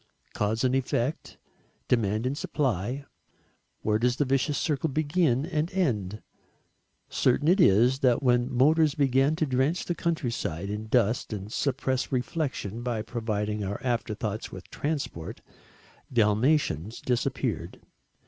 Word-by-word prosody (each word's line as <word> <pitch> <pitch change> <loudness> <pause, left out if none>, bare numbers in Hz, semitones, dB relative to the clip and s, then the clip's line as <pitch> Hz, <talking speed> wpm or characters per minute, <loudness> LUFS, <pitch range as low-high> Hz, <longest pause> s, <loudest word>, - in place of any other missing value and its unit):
Cause 110 +3 0
and 130 0 +2
effect, 130 +2 -1 0.5
demand 110 -1 +1
and 130 +2 0
supply, 130 - -1 0.8
where 105 0 +2
does 125 +1 +2
the 145 - +1
vicious 135 +2 +1
circle 155 +1 0
begin 145 -2 +1
and 160 -1 -1
end? 110 - -1 0.8
Certain 135 +4 +1
it 185 +3 +5
is 120 - +5
that 130 0 +3
when 125 0 +2
motors 150 +4 +4
began 135 +1 +3
to 155 - 0
drench 135 +5 0
the 175 - -1
countryside 120 - -2
in 105 +1 -4
dust 115 0 +1
and 105 +2 -6
suppress 130 -1 -1
reflexion 125 - -2
by 120 -3 -2
providing 105 -3 -2
our 100 +1 -3
afterthoughts 110 -3 -2
with - - -10
transport, 145 - -4 0.7
Dalmatians 110 - +2
disappeared. 120 -8 -2
125 Hz, 125 wpm, -27 LUFS, 110-145 Hz, 0.8 s, it